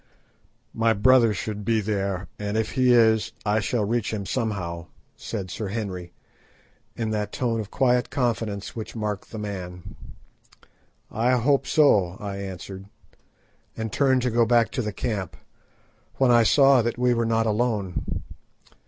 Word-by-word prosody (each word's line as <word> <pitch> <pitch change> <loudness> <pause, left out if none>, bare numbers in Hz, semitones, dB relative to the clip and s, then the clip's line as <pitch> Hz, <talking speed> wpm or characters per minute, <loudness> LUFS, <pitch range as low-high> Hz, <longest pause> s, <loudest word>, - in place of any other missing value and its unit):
"My 115 0 +2
brother 115 +2 +5
should 105 +1 -4
be 115 +2 +1
there, 100 -2 -2
and 105 +1 -2
if 110 0 -1
he 130 -1 +3
is, 110 -2 +4
I 105 +1 +2
shall 110 0 -1
reach 115 +1 -1
him 105 -3 -4
somehow," 90 -7 -3 0.3
said 95 -5 -6
Sir 110 - -4
Henry, 95 -4 -5 0.8
in 110 -2 -2
that 105 -1 -2
tone 115 -3 -1
of 105 -2 -5
quiet 125 -1 +1
confidence 115 -6 -2
which 110 0 -7
marked 105 -3 -4
the 110 - -8
man. 95 -3 -7 1.2
"I 120 +3 +1
hope 135 +3 +2
so," 100 - +3
I 100 -1 -5
answered, 95 0 -7 0.9
and 110 -2 -4
turned 130 -3 +2
to 125 - 0
go 120 +1 +3
back 115 0 +3
to - - -2
the 105 -2 -3
camp, 100 -1 -4 0.8
when 130 -2 +3
I 120 -1 +6
saw 135 +2 +5
that 120 +1 -2
we 125 0 +2
were 115 0 0
not 115 0 +1
alone. 105 -4 -1
110 Hz, 155 wpm, -24 LUFS, 100-120 Hz, 1.2 s, I